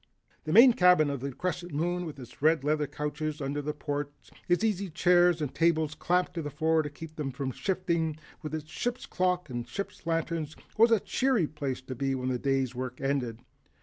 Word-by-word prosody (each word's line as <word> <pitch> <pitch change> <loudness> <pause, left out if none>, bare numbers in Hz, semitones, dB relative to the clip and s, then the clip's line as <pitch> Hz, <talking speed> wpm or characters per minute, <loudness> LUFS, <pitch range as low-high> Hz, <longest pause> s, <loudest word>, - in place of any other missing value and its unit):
The 155 - -2
main 235 +6 +9
cabin 180 -7 +5
of 140 - -3
the 140 +2 -4
Crescent 175 +2 -4
Moon, 175 +3 -1
with 150 - -8
its 125 -1 -12
red 155 -1 +4
leather 150 0 +1
couches 150 +1 -3
under 140 +1 -2
the 150 +1 -2
ports, 145 -1 -5 0.2
its 175 +4 +2
easy 200 -3 0
chairs 175 0 +4
and 140 - -3
tables 160 -2 +2
clamped 180 +3 0
to 170 - -3
the 145 - -4
floor 160 +2 +2
to 150 - -4
keep 155 +2 -10
them 150 -3 -2
from 135 0 -3
shifting, 170 -1 -1 0.2
with 155 -1 -4
its 155 -1 -6
ship's 245 +7 -3
clock 180 -2 0
and 120 -1 -4
ship's 165 +5 -6
lanterns, 165 -2 -1 0.2
was 230 +2 +6
a 225 -2 +4
cheery 255 -4 +1
place 140 -4 -4
to 130 - -6
be 135 +2 -1
when 130 0 -2
the 125 -1 -1
day's 135 -2 0
work 125 0 -5
was 135 - 0
ended. 120 -5 -2
155 Hz, 210 wpm, -29 LUFS, 140-175 Hz, 0.2 s, main